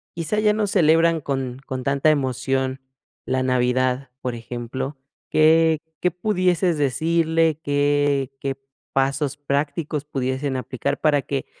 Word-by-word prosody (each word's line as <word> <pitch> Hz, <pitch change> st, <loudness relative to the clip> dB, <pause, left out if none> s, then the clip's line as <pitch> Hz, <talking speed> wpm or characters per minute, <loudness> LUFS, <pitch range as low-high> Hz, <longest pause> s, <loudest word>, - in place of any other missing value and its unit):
quizá 170 Hz, +5 st, -1 dB
ya 210 Hz, -1 st, +3 dB
no 215 Hz, 0 st, 0 dB
celebran 165 Hz, -2 st, +3 dB
con 135 Hz, -3 st, -3 dB
con 130 Hz, -1 st, -4 dB
tanta 140 Hz, +3 st, +2 dB
emoción 130 Hz, -1 st, 0 dB, 0.4 s
la 130 Hz, 0 st, 0 dB
navidad, 130 Hz, +1 st, +1 dB
por 125 Hz, -, -2 dB
ejemplo, 120 Hz, +4 st, -5 dB, 0.3 s
qué 160 Hz, 0 st, +4 dB, 0.2 s
qué 180 Hz, -, +3 dB
pudieses 180 Hz, -2 st, +1 dB
decirle, 160 Hz, +3 st, +1 dB
¿qué 145 Hz, -1 st, +1 dB
qué 135 Hz, 0 st, -2 dB, 0.4 s
pasos 135 Hz, +1 st, 0 dB
prácticos 145 Hz, +1 st, -2 dB
pudiesen 130 Hz, -1 st, -2 dB
aplicar 130 Hz, 0 st, -3 dB
para 150 Hz, -2 st, +3 dB
que 135 Hz, -1 st, -3 dB
140 Hz, 125 wpm, -22 LUFS, 130-160 Hz, 0.4 s, qué